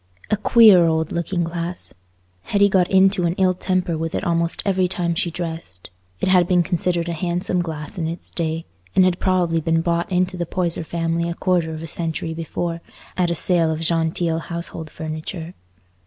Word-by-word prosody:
A - - +5
queer 210 -4 +7
old 160 -1 0
looking 170 +1 -1
glass! 170 +1 -4 0.5
Hetty 200 0 +3
got 185 -2 +2
into 190 -2 +4
an 170 - -1
ill 185 -1 +3
temper 180 -3 -1
with 165 0 -3
it - - -2
almost 170 0 0
every 190 -2 +2
time 175 -2 -1
she 170 +1 -1
dressed. 165 - -6 0.3
It - - -1
had 180 -2 +4
been 180 -1 +3
considered 175 0 -1
a 170 - -2
handsome 175 +2 -1
glass 160 -1 -6
in 160 - -1
its 165 +2 -5
day, 165 -1 -3 0.3
and 185 - +6
had 185 -1 +1
probably 180 -3 +1
been 165 +1 +1
bought 170 +2 -1
into 185 0 0
the 175 -1 -3
Poyser 170 -2 -1
family 165 +1 -1
a 170 - -4
quarter 175 -4 0
of 160 0 -6
a - - -6
century 160 0 -3
before, 165 +1 -4 0.3
at 180 -2 +1
a 170 - 0
sale 170 -1 +3
of 160 0 -2
genteel 165 0 +1
household 170 -1 -5
furniture. 160 +2 -6
170 Hz, 185 wpm, -21 LUFS, 165-180 Hz, 0.5 s, queer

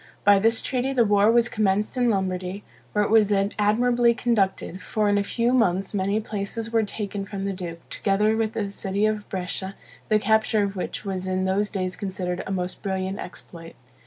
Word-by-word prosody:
By 200 -1 +6
this 225 +2 +2
treaty 260 0 -1
the 240 -3 +4
war 205 +1 +4
was 235 0 +4
commenced 210 -2 0
in 245 -1 +2
Lombardy, 185 -1 -2 0.3
where 210 - +2
it 205 - -2
was 215 -2 +5
admirably 220 +4 +2
conducted; 195 -6 0
for 215 +2 0
in 205 0 +3
a - - 0
few 235 +4 0
months 195 -6 +1
many 200 +1 0
places 220 +1 -4
were 225 - +4
taken 205 -1 -4
from 195 -1 -5
the 200 - -1
duke, 170 -3 -7
together 210 +2 +1
with 220 -1 -1
the 210 -4 -2
city 200 +1 -1
of 215 -1 -1
Brescia, 190 +1 -4 0.3
the 215 - +5
capture 220 0 +2
of 200 0 -2
which 185 +3 -4
was 190 -1 -3
in 185 0 0
those 200 +2 +1
days 185 -2 -3
considered 185 -2 -3
a - - -4
most 180 -1 -3
brilliant 190 0 -2
exploit. 165 -1 -9
205 Hz, 190 wpm, -24 LUFS, 190-220 Hz, 0.3 s, By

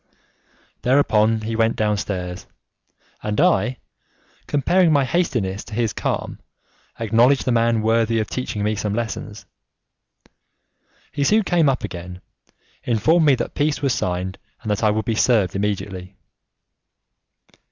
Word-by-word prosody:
Thereupon 115 -4 +3
he 110 +1 -3
went 115 0 +2
downstairs, 95 -4 -2 0.7
and 105 +3 -2
I, 155 -7 +2 0.7
comparing 170 +5 +2
my 140 -3 +3
hastiness 115 - -1
to 110 - -9
his 115 -2 0
calm, - - -3 0.6
acknowledged 115 +5 +3
the 130 - +1
man 115 -1 +2
worthy 115 0 +2
of 110 - -1
teaching 120 -5 -4
me 105 +1 +1
some 105 -1 -2
lessons. 110 -3 -5 1.7
He 145 - -1
soon 215 +9 +3
came 170 -5 +2
up 130 - -1
again, 90 +1 -7 0.6
informed 150 +9 +2
me 140 - +6
that 120 - -4
peace 150 0 -1
was 135 -2 +2
signed, 95 -4 -3 0.2
and 110 - -2
that 105 - -1
I 105 - +4
would 110 +1 -1
be 115 - 0
served 110 -5 +2
immediately. 95 -2 -3
115 Hz, 130 wpm, -21 LUFS, 105-130 Hz, 1.7 s, me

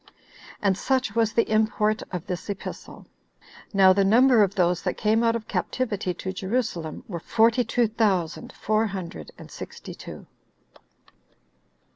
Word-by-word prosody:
And 195 -2 +3
such 255 +1 0
was 225 -1 +2
the 230 - +2
import 215 0 +1
of 180 -2 -4
this 180 +3 -5
epistle. 200 0 -7 0.7
Now 190 -2 +6
the 200 +1 +2
number 235 +4 +5
of 200 -1 +2
those 180 -2 +2
that - - -2
came 220 +1 +2
out 230 0 +3
of 225 -1 -5
captivity 210 -7 -2
to 190 - -5
Jerusalem, 190 -5 -3
were 175 -5 -5
forty 230 +6 +3
two 240 -1 +1
thousand 200 -7 -1
four 215 +2 0
hundred 190 -4 -7
and - - -12
sixty - - -9
two. - - -10
210 Hz, 145 wpm, -25 LUFS, 190-225 Hz, 0.7 s, Now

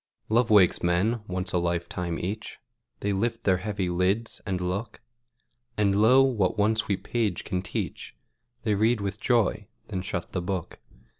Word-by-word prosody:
Love 115 +2 +3
wakes 100 -5 +5
men, 95 +7 +1
once 95 +1 -3
a 90 - +3
lifetime 85 0 -2
each; 105 +5 -5 0.4
They 100 0 0
lift 115 +3 -1
their 95 -2 +3
heavy 100 -1 -2
lids, 95 +6 0
and 95 -2 -1
look; 90 +5 -3 0.8
And, 100 -2 +3
lo, 115 +6 +6
what 110 -8 +1
one 105 +2 +3
sweet 100 -3 -1
page 110 -7 -1
can 90 - -2
teach, - - -5 0.5
They 110 - +1
read 110 +3 +2
with 100 +1 -3
joy, 105 -4 +1 0.2
then 95 -4 -2
shut 85 -2 -4
the 90 - -2
book. 90 -1 -4
100 Hz, 160 wpm, -27 LUFS, 90-110 Hz, 0.8 s, lo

